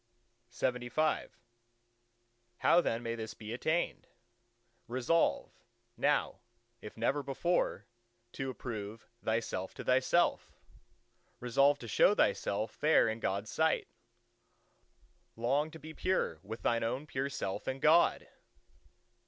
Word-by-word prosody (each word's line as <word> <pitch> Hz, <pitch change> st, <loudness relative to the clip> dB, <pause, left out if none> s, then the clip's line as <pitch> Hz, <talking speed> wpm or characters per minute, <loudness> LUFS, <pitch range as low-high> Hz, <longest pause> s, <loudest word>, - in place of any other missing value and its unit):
LXXVI 125 Hz, +5 st, 0 dB, 1.3 s
How 175 Hz, -, +5 dB
then 115 Hz, -6 st, -2 dB
may 115 Hz, 0 st, -2 dB
this 110 Hz, -1 st, -6 dB
be 110 Hz, +1 st, -7 dB
attained?—Resolve, 120 Hz, -1 st, -2 dB, 0.4 s
now -, -, +1 dB, 0.4 s
if 105 Hz, -, -10 dB
never 135 Hz, +6 st, +1 dB
before, 140 Hz, +6 st, -1 dB, 0.5 s
to 135 Hz, +2 st, -4 dB
approve 115 Hz, -3 st, -6 dB, 0.2 s
thyself 110 Hz, -4 st, -2 dB
to -, -, -7 dB
thyself; 130 Hz, +7 st, +2 dB, 0.8 s
resolve 140 Hz, +4 st, +3 dB
to 120 Hz, -, -9 dB
show 105 Hz, -, +4 dB
thyself 105 Hz, +2 st, +1 dB
fair 155 Hz, -3 st, +3 dB
in 110 Hz, 0 st, -2 dB
God's 100 Hz, 0 st, -2 dB
sight; 160 Hz, 0 st, +1 dB, 1.5 s
long 135 Hz, +7 st, +1 dB
to 160 Hz, -, -10 dB
be 160 Hz, +1 st, -10 dB
pure 170 Hz, -, -1 dB
with 110 Hz, +4 st, -8 dB
thine 115 Hz, -1 st, +1 dB
own 125 Hz, +6 st, -2 dB
pure 135 Hz, -1 st, -2 dB
self 100 Hz, -6 st, -4 dB
and 130 Hz, +1 st, -2 dB
God! 160 Hz, +4 st, +4 dB
120 Hz, 110 wpm, -32 LUFS, 115-145 Hz, 1.5 s, How